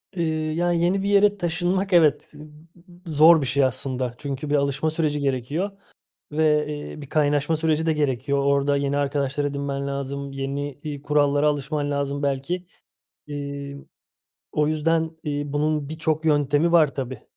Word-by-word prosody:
Iıı, 155 -2 -1
ya, 175 +2 +1
yeni 175 +3 +1
bir 200 - 0
yere 205 0 +4
taşınmak, 180 +2 -1
evet, 155 -4 +4 0.7
zor 160 +1 +6
bir 135 - -1
şey 140 +1 +2
aslında. 130 -1 -1
Çünkü 140 +1 -5
bir 150 - +2
alışma 140 +2 +1
süreci 155 -2 -1
gerekiyor 140 +8 -1 0.6
ve, 150 -1 +2
eee, 150 0 -6
bir 140 - -9
kaynaşma 145 +1 +1
süreci 160 0 0
de 160 - +3
gerekiyor. 140 -2 0
Orada 140 0 +2
yeni 140 0 0
arkadaşlar 140 0 -1
edinmen 140 -1 -3
lazım. 140 0 -4
Yeni, 140 +1 -4
iii, 145 -2 -6
kurallara 145 0 +2
alışman 145 0 -1
lazım 140 0 -2
belki. 140 +6 -2 0.6
İii, 140 -1 -6 0.7
o 150 -1 +1
yüzden, 160 +1 +1
iii, 145 -1 -3
bunun 150 -1 0
birçok 160 0 -2
yöntemi 145 +2 +2
var 155 -6 +4
tabii. 130 -1 -5
145 Hz, 150 wpm, -24 LUFS, 140-160 Hz, 0.7 s, zor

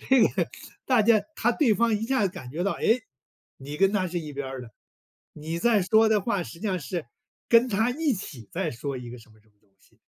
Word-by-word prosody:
这 265 -3 +6
个 - - -1 0.4
大 250 -5 +4
家 220 -1 +4
他 240 +1 +2
对 235 -5 +3
方 230 0 +2
一 220 +2 -2
下 260 -3 +1
子 180 - -5
感 125 - -9
觉 170 +7 -3
到， 200 - +1
哎？ - - -6 0.7
你 145 +2 -7
跟 195 +4 +3
他 185 -3 0
是 175 +1 -2
一 150 -3 -7
边 140 -1 -5
儿 130 -1 -6
的， 115 - -12 0.6
你 160 +2 -5
在 215 0 +3
说 220 +4 +4
的 210 -2 +2
话， 200 -4 0
实 - - -9
际 220 - -4
上 185 -4 -1
是 155 +3 -4 0.5
跟 235 +2 +6
他 225 +3 +1
一 295 -1 0
起 130 - -8
在 170 -2 -2
说 135 +3 -5
一 120 -1 -8
个 125 - -9
什 110 - -17
么 110 - -22
什 110 - -30
么 - - -32
东 105 - -35
西。 - - -28
185 Hz, 265 characters per minute, -26 LUFS, 140-225 Hz, 0.7 s, 这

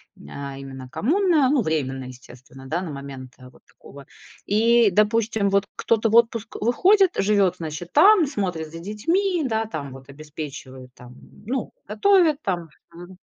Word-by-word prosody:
ня 140 - -9
именно 135 -1 -9
коммуна. 315 - +2
Ну, 280 -4 +2
временная, 135 -6 -3
естественно, 130 +1 -14
да, 170 +6 -2
на 175 - -6
момент, 135 -2 -9
э, 125 -1 -14
вот - - -23
такого. 140 0 -15 0.4
И, 230 +1 +3
допустим, 210 0 +1
вот 200 0 +1
кто-то 225 -1 0
вот 235 +2 +6
в - - -27
отпуск 230 -1 -9
выходит, 370 - +3
живёт, 195 -3 +2
значит, 160 +1 -7
там, 380 +3 +6
смотрит 180 - -4
за 165 - -8
детьми, 330 - -1
да, 225 -1 -1
там, 145 -10 -6
вот, 135 +1 -13
обеспечивает, 140 -3 -10
там, 125 0 -14 0.3
ну, 260 +4 -4
готовит 355 -7 +2
там, 175 -4 -3 0.2
мгм. 175 +2 -12
185 Hz, 160 wpm, -23 LUFS, -, 0.4 s, вот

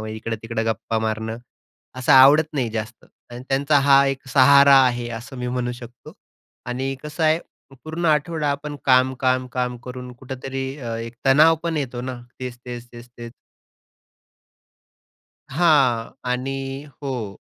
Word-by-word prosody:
व 110 - -6
इकडं-तिकडं 115 +1 -4
गप्पा 115 0 -2
मारणं, 110 +1 -3 0.6
असं 130 - +2
आवडत 140 +4 +7
नाही 130 -6 -1
जास्त. 110 +1 -6 0.3
आणि 120 +1 -8
त्यांचा 140 +2 +2
हा 140 0 +5
एक 135 0 -3
सहारा 140 +2 +6
आहे 120 -1 -2
असं 125 +3 -11
मी 125 - -3
म्हणू 125 0 -2
शकतो. 120 0 -12 0.5
आणि 130 +2 -3
कसं 150 +2 -5
आहे, 155 +1 +3 0.5
पूर्ण 160 +2 -5
आठवडा 155 0 +1
आपण 145 +1 -4
काम, 130 0 +4
काम, 130 -1 +1
काम 125 -1 -2
करून 125 0 -8
कुठेतरी 135 +1 -6
अ, 115 -3 -5
एक 115 +1 -7
तणाव 155 +5 +6
पण 165 -1 -2
येतो 130 -4 -3
ना. 125 0 -6 0.2
तेच-तेच, 125 -1 -7
तेच-तेच. 120 0 -11 2.2
हां. 135 -7 +2 0.2
आणि 135 +2 -4 0.2
हो. 120 -8 -4
130 Hz, 135 wpm, -22 LUFS, 120-140 Hz, 2.2 s, आवडत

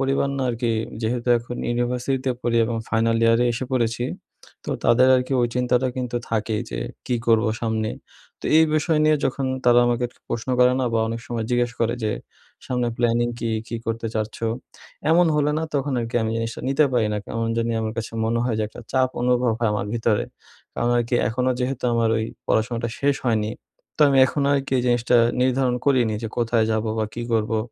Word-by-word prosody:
পরিবার 135 +1 +1
না - - 0
আরকি 120 0 -1 0.3
যেহেতু 120 +2 -1
এখন 120 +1 -7
ইউনিভার্সিটিতে 125 +2 -1
পড়ি 115 -1 0
এবং 115 +1 -2
ফাইনাল 115 0 +2
ইয়ারে 115 +1 +4
এসে 120 +3 -3
পড়েছি, 120 -1 0 0.6
তো - - -4
তাদের 125 +2 +5
আরকি 130 +1 -2
ওই 120 - +3
চিন্তাটা 125 +1 +1
কিন্তু 125 -1 -2
থাকেই 110 -1 -1
যে, - - -4 0.3
"কি 125 - 0
করবো 115 0 +4
সামনে?" 110 -1 -1 0.5
তো - - -18
এই 160 - +7
বিষয় 155 +1 +2
নিয়ে 155 0 +4
যখন 135 0 -1 0.2
তারা 120 0 +6
আমাকে 120 0 +1 0.2
প্রশ্ন 115 +2 -4
করে 125 0 +5
না - - +1
বা 115 - +2
অনেক 115 +1 -4
সময় 115 -2 -3
জিজ্ঞেস 120 0 +1
করে 115 +1 +1
যে, 110 - 0 0.6
"সামনে 125 -2 0
প্ল্যানিং 120 0 +2
কী? 115 - -2 0.2
কী 115 - -3
করতে 115 0 -2
চাচ্ছ?" 110 0 -2 0.7
এমন 175 +2 +5
হলে 150 0 +2
না 160 - -2
তখন 140 0 0
আরকি 115 +1 -3
আমি 110 0 -1
এস 115 - -5
নিতে 140 +3 +4
পারি 115 -3 +2
না। 105 - -1
কেমন 115 0 -2
জানি 115 0 0
আমার 110 0 -2
কাছে 115 0 -4
মনে 115 +1 0
হয় 120 -3 0
যে 110 - +1
একটা - - -11
চাপ 130 -1 +3
অনুভব 125 -1 +2
হয় 115 -2 +1
আমার 105 -1 -2
ভিতরে। 115 -2 +1 0.5
কারণ 120 - 0
আরকি 120 +1 -1
এখনো 125 +2 0
যেহেতু 125 0 -2
আমার 115 -1 +2
ওই 110 - -1 0.2
পড়াশোনাটা 115 +1 0
শেষ 140 0 +2
হয়নি 110 -2 +1 0.5
তো - - +5
আমি 135 -1 +3
এখনো 140 +1 -1
আরকি 140 -1 -2
এই - - 0
জিনিসটা 120 0 +3 0.2
নির্ধারণ 130 0 +2
করিনি 125 -6 +3
যে 115 - -3
কোথায় 115 -1 +2
যাবো 110 0 -1
বা 110 - +1
কি 120 - -4
করবো? 110 0 +1
120 Hz, 195 wpm, -23 LUFS, 115-125 Hz, 0.7 s, এই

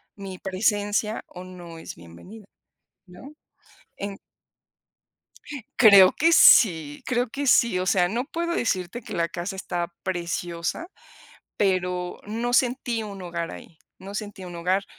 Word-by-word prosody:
mi 195 -2 -8
presencia, 205 +2 -1
o 180 - -10
no 175 -2 -11
es - - -9
bienvenida?, 85 - -14 0.6
¿no?, 180 +11 -13 0.6
en 200 0 -6 1.6
creo 200 -5 +8
que 330 +2 +2
sí 160 - +6
creo 245 0 0
que 280 +5 -4
sí. 235 -6 +4
O 185 - -2
sea, 180 -1 +3
no 235 +6 -2
puedo 340 +3 -3
decirte 190 - -2
que 225 - -8
la 170 0 0
casa 175 +4 -5
está 175 -2 -3
preciosa, 175 - -3 0.7
pero 180 -2 -1
no 230 +3 -3
sentí 245 -2 +1
un 200 -2 -8
hogar 170 -1 -4
ahí, 160 - -12 0.2
no 195 +1 -10
sentí 205 -2 -6
un 175 -1 -9
hogar, 185 +3 0
190 Hz, 135 wpm, -24 LUFS, 175-225 Hz, 1.6 s, creo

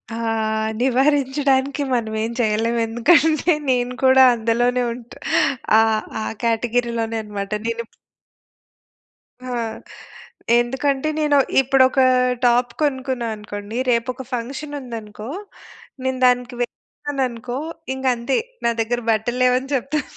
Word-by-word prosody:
ఆహ్, 220 -1 -1
నివారించడానికి 270 +1 +2
మనమేం 220 -1 -1
చేయలేం. 225 +1 +1
ఎందుకంటే 315 +8 +3 0.2
నేను 250 -1 +1
కూడా 260 0 +7
అందులోనే 240 +2 +1
ఉంటా 240 0 -12 0.6
ఆహ్, 220 -1 +1 0.2
ఆ - - -2 0.2
కేటగిరీలోనే 230 0 0
అన్నమాట. 205 -1 -6 0.2
నేను 230 0 -2
ఇప్పు - - -34 1.5
హా! 250 -1 -3 1.0
ఎందుకంటే 270 +4 -1
నేను 295 -2 +3 0.2
ఇప్పుడొక 265 0 +3 0.5
టాప్ 245 0 +3
కొనుక్కున్నా 260 -4 -1
అనుకోండి, 210 +1 -7
రేపొక 250 +2 0
ఫంక్షన్ 270 +5 -4
ఉందనుకో, 225 -3 -8 0.7
నేను 260 0 -1
దానికి 250 0 +2
వేశాననుకో 250 -1 -4 0.4
ఇంక 265 0 -6
అంతే, 235 +3 -1 0.3
నా 235 - +4
దగ్గర 240 +2 -1
బట్టలేవని 250 +4 +1
చెప్తా. 275 +4 -1
245 Hz, 100 wpm, -21 LUFS, 230-265 Hz, 1.5 s, కూడా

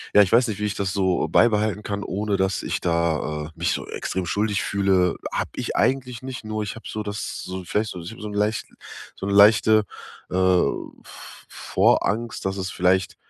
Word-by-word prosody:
ja, 105 - +9
ich 95 - -3
weiß 120 +2 +5
nicht, 105 -2 -4
wie 105 - -1
ich 105 - -2
das 95 -1 -2
so 95 -2 +1
beibehalten 105 -2 +3
kann, 100 0 -3
ohne 100 +1 -1
dass 95 +1 0
ich - - -2
da, 80 -3 0
äh, - - -12
mich - - 0
so - - -5
extrem 95 -1 -3
schuldig 100 +1 0
fühle. 95 -3 +2 0.2
Hab - - -1
ich - - -4
eigentlich 125 -2 0
nicht, 130 -3 -7
nur 110 0 -3
ich 100 - -5
hab 110 - -12
so 110 - -4
das 105 0 -5
so 95 0 -6
vielleicht 105 +5 -1
so 90 - -7
so 90 +7 -8
'n 105 - -7
leicht 105 +2 0 0.5
so - - -6
'ne 100 - 0
leichte, 105 +1 +6 0.5
äh, - - -2
V 95 -1 +2 0.6
Vorangst, 115 -1 0
dass 95 0 -1
es 95 0 -3
vielleicht 95 0 +1
100 Hz, 200 wpm, -23 LUFS, 95-110 Hz, 0.6 s, ja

